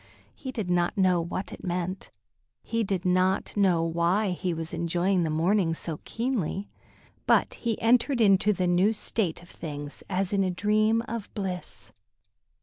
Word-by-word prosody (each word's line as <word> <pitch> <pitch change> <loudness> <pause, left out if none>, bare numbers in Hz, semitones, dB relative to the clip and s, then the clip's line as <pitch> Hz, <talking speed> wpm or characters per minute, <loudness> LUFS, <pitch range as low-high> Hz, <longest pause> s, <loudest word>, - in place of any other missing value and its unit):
He 260 - -7
did 215 -8 -3
not 175 +3 +1
know 185 -3 +3
what 180 +3 -4
it - - -11
meant; 180 +1 -3 0.5
he 230 0 -1
did 190 -3 -2
not 185 +1 +1
know 185 -5 +3
why 170 +5 +1
he 180 0 -2
was 165 0 -4
enjoying 175 +3 +1
the 165 - 0
morning 165 +2 +2
so 160 -2 -4
keenly; 225 -6 -2 0.6
but - - +3
he 230 -3 -2
entered 245 +3 +3
into 205 -1 +5
the 185 -2 0
new 180 +5 +3
state 195 -5 -2
of 175 - -17
things 145 -2 -7
as 190 0 -1
in 195 -1 +3
a 185 - +1
dream 215 +4 +2
of 230 -2 -5
bliss. 190 -4 -5
185 Hz, 160 wpm, -27 LUFS, 175-210 Hz, 0.6 s, into